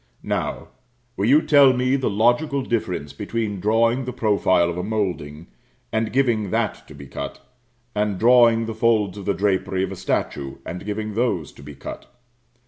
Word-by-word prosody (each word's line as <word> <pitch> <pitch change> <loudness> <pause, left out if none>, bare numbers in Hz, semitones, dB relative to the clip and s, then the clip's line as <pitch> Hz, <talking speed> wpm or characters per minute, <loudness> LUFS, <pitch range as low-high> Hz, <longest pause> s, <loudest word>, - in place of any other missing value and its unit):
Now, - - -3 0.5
will 100 - 0
you 145 +5 +5
tell 140 -3 +6
me 130 +1 +1
the 135 -2 0
logical 120 +7 +1
difference 90 - -2
between 110 -4 -3
drawing 115 +5 +2
the 125 - -3
profile 100 -7 +2
of 85 - -3
a - - -2
moulding 90 -8 -3 0.5
and 110 0 -1
giving 120 -6 +1
that - - -2
to - - -12
be 70 0 -10
cut, - - -6 0.5
and 105 -2 -1
drawing 115 0 +5
the 115 - -4
folds 110 -3 +1
of 100 - -8
the 100 - 0
drapery 95 -1 0
of 95 - -3
a - - -5
statue 70 -5 -2
and 90 +3 -6
giving 105 +1 -3
those 110 - -1
to - - -16
be 70 0 -10
cut. 70 - -9
110 Hz, 175 wpm, -22 LUFS, 95-120 Hz, 0.5 s, tell